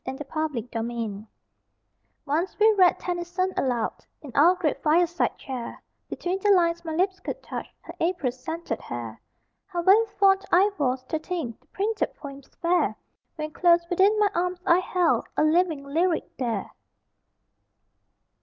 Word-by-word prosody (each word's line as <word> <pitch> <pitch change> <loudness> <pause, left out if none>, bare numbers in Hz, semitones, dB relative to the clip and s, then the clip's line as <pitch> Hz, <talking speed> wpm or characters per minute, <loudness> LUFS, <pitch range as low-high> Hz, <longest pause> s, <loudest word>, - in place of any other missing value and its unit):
READING 275 -2 -3 0.2
ALOUD 225 -3 -5 1.0
Once 325 +7 -1
we 435 +1 +5
read 370 -4 +5
Tennyson 355 +1 -2
aloud 245 -4 -1 0.2
In 280 - -9
our 335 +6 +5
great 330 -5 -1
fireside 340 +2 +2
chair; 255 -3 -6 0.3
Between 365 +2 -3
the 410 - +1
lines, 340 -3 +3
my 320 -2 -4
lips 375 +2 0
could - - -6
touch - - -6
Her - - -10
April 330 -7 0
scented 320 +7 -5
hair. 115 -2 -7 0.5
How 350 -4 -3
very 400 +5 +6 0.2
fond 390 -1 +5
I 390 +4 +5
was, 255 -2 0
to 310 +5 -3
think 310 -9 -5
The - - -33
printed 425 +2 -2
poems 275 -2 -10
fair, 350 +1 +2 0.4
When 305 -1 -5
close 340 0 +3
within 390 +4 +4
my 415 -1 +3
arms 360 +1 -1
I 340 +1 +5
held 360 -2 +1
A - - +4
living 320 -2 +2
lyric 330 +4 0
there! 240 -3 -3
340 Hz, 145 wpm, -25 LUFS, 280-365 Hz, 1.0 s, very